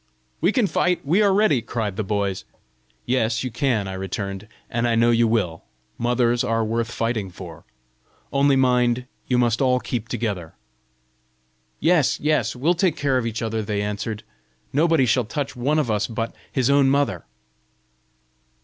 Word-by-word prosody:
"We 175 Hz, +5 st, +3 dB
can 245 Hz, -2 st, +2 dB
fight! 180 Hz, -4 st, 0 dB
we 175 Hz, +9 st, +3 dB
are 200 Hz, -2 st, +4 dB
ready!" 190 Hz, -, +3 dB
cried 110 Hz, -3 st, -3 dB
the 110 Hz, -, -2 dB
boys. 100 Hz, -1 st, -2 dB, 0.6 s
"Yes, 115 Hz, -2 st, 0 dB
you 130 Hz, -, -3 dB
can," 115 Hz, -7 st, 0 dB
I 95 Hz, -, -5 dB
returned, 95 Hz, +1 st, -5 dB, 0.2 s
"and 120 Hz, +1 st, -1 dB
I 115 Hz, -, +2 dB
know 115 Hz, +1 st, +4 dB
you 115 Hz, 0 st, +3 dB
will: 100 Hz, -8 st, -1 dB, 0.4 s
mothers 120 Hz, 0 st, +2 dB
are 115 Hz, 0 st, 0 dB
worth 115 Hz, +1 st, -1 dB
fighting 115 Hz, -4 st, -2 dB
for! 90 Hz, -3 st, -11 dB, 0.7 s
Only 140 Hz, 0 st, +4 dB
mind, 125 Hz, -1 st, +2 dB, 0.2 s
you 125 Hz, -, +2 dB
must 120 Hz, -1 st, +2 dB
all 125 Hz, -1 st, +3 dB
keep 115 Hz, -3 st, -4 dB
together." 100 Hz, -9 st, -4 dB, 1.2 s
"Yes, 160 Hz, -2 st, +3 dB
yes; 150 Hz, -2 st, +1 dB
we'll 150 Hz, +8 st, +2 dB
take 170 Hz, -2 st, +1 dB
care 135 Hz, -3 st, +1 dB
of 115 Hz, -, -2 dB
each 115 Hz, 0 st, -3 dB
other," 110 Hz, 0 st, -1 dB
they 105 Hz, -1 st, -2 dB
answered. 105 Hz, +1 st, -4 dB, 0.5 s
"Nobody 160 Hz, -1 st, +3 dB
shall 125 Hz, 0 st, +2 dB
touch 140 Hz, +4 st, -4 dB
one 135 Hz, +5 st, 0 dB
of 140 Hz, -7 st, +1 dB
us 105 Hz, -1 st, 0 dB
but 115 Hz, 0 st, -4 dB, 0.2 s
his 130 Hz, -3 st, +1 dB
own 140 Hz, -1 st, +4 dB
mother!" 135 Hz, -, 0 dB
120 Hz, 165 wpm, -23 LUFS, 110-140 Hz, 1.2 s, are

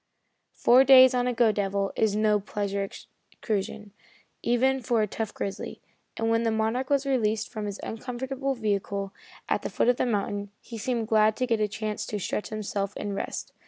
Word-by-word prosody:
Four 250 Hz, +2 st, +6 dB
days 260 Hz, -1 st, +8 dB
on 250 Hz, 0 st, +1 dB
a 250 Hz, -, +1 dB
"go 230 Hz, -2 st, +4 dB
devil" 200 Hz, -1 st, -1 dB
is 215 Hz, -2 st, +1 dB
no 210 Hz, -1 st, +3 dB
pleasure 200 Hz, 0 st, -2 dB
excursion, 210 Hz, +1 st, -6 dB, 0.5 s
even 265 Hz, +2 st, +2 dB
for 230 Hz, -1 st, +1 dB
a -, -, 0 dB
tough 220 Hz, +1 st, -4 dB
grizzly, 195 Hz, -, -5 dB, 0.4 s
and 225 Hz, -, 0 dB
when 230 Hz, 0 st, +3 dB
the 230 Hz, -, +1 dB
Monarch 225 Hz, +4 st, 0 dB
was 280 Hz, -1 st, +2 dB
released 225 Hz, -5 st, 0 dB
from 215 Hz, -3 st, -5 dB
his 200 Hz, 0 st, -5 dB
uncomfortable 265 Hz, +4 st, -3 dB
vehicle, 200 Hz, -3 st, -2 dB, 0.3 s
at -, -, 0 dB
the -, -, -4 dB
foot -, -, +1 dB
of 245 Hz, -, +3 dB
the -, -, +1 dB
mountain, 205 Hz, -2 st, -2 dB
he 230 Hz, -2 st, -9 dB
seemed 230 Hz, 0 st, -1 dB
glad 215 Hz, -1 st, +4 dB
to 255 Hz, -, +1 dB
get 230 Hz, -3 st, +1 dB
a 210 Hz, -, +2 dB
chance 215 Hz, 0 st, -4 dB
to 210 Hz, -, -3 dB
stretch 205 Hz, +1 st, -3 dB
himself 205 Hz, -2 st, -3 dB
and 205 Hz, -1 st, -3 dB
rest. 195 Hz, -, -5 dB
220 Hz, 190 wpm, -27 LUFS, 205-245 Hz, 0.5 s, days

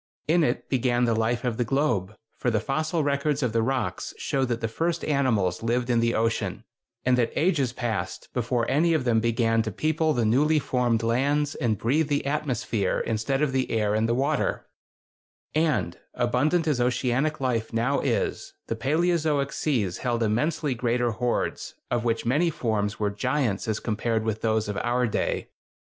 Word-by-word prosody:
In 165 Hz, +2 st, +4 dB
it -, -, -1 dB
began 125 Hz, -2 st, +1 dB
the 115 Hz, -, +2 dB
life 115 Hz, +2 st, 0 dB
of 120 Hz, -3 st, -1 dB
the 120 Hz, -, +1 dB
globe, 110 Hz, -6 st, 0 dB, 0.2 s
for 125 Hz, -, -1 dB
the 110 Hz, -2 st, +1 dB
fossil 155 Hz, +7 st, -1 dB
records 145 Hz, 0 st, 0 dB
of 120 Hz, -3 st, 0 dB
the 115 Hz, -, +2 dB
rocks 130 Hz, 0 st, -2 dB
show 135 Hz, -1 st, 0 dB
that 120 Hz, -2 st, -2 dB
the 115 Hz, -, -1 dB
first 165 Hz, +8 st, -2 dB
animals 115 Hz, -11 st, +1 dB
lived 120 Hz, +2 st, 0 dB
in 120 Hz, -, +3 dB
the 115 Hz, 0 st, +1 dB
ocean, 115 Hz, +1 st, -1 dB, 0.4 s
and 125 Hz, 0 st, +3 dB
that 115 Hz, -, +1 dB
ages 150 Hz, -7 st, +2 dB
passed 110 Hz, -7 st, -3 dB
before 120 Hz, -1 st, 0 dB
any 165 Hz, +5 st, +3 dB
of 155 Hz, -, 0 dB
them 120 Hz, -3 st, +3 dB
began 115 Hz, 0 st, +2 dB
to 110 Hz, 0 st, -3 dB
people 155 Hz, -, +1 dB
the 120 Hz, -4 st, +1 dB
newly 145 Hz, +8 st, +3 dB
formed 125 Hz, -5 st, +1 dB
lands 140 Hz, +5 st, +1 dB
and 110 Hz, -4 st, 0 dB
breathe 145 Hz, +9 st, +1 dB
the 145 Hz, -2 st, 0 dB
atmosphere 125 Hz, -8 st, -1 dB
instead 115 Hz, +6 st, -1 dB
of 145 Hz, -, +1 dB
the 130 Hz, -1 st, 0 dB
air 105 Hz, -2 st, +1 dB
in 110 Hz, +1 st, +1 dB
the 115 Hz, -, +1 dB
water; 140 Hz, +3 st, 0 dB, 0.9 s
and, 140 Hz, -, 0 dB, 0.2 s
abundant 140 Hz, +8 st, +1 dB
as 140 Hz, -5 st, +1 dB
oceanic 125 Hz, +4 st, 0 dB
life 120 Hz, -4 st, -1 dB
now 120 Hz, +5 st, +1 dB
is, -, -, -2 dB
the 115 Hz, -, -3 dB
paleozoic 150 Hz, +2 st, +1 dB
seas 110 Hz, -, -1 dB
held 120 Hz, -2 st, 0 dB
immensely 145 Hz, +7 st, 0 dB
greater 120 Hz, 0 st, 0 dB
hordes, 120 Hz, +2 st, -2 dB, 0.2 s
of 120 Hz, -1 st, 0 dB
which 115 Hz, -1 st, 0 dB
many 150 Hz, +9 st, +2 dB
forms 110 Hz, -8 st, -1 dB
were 105 Hz, -1 st, 0 dB
giants 105 Hz, 0 st, -1 dB
as 110 Hz, -2 st, -1 dB
compared 110 Hz, 0 st, -1 dB
with 110 Hz, -1 st, -2 dB
those 110 Hz, -1 st, +1 dB
of 105 Hz, -1 st, -3 dB
our 125 Hz, +2 st, +1 dB
day. 110 Hz, -, -1 dB
125 Hz, 180 wpm, -26 LUFS, 115-145 Hz, 0.9 s, In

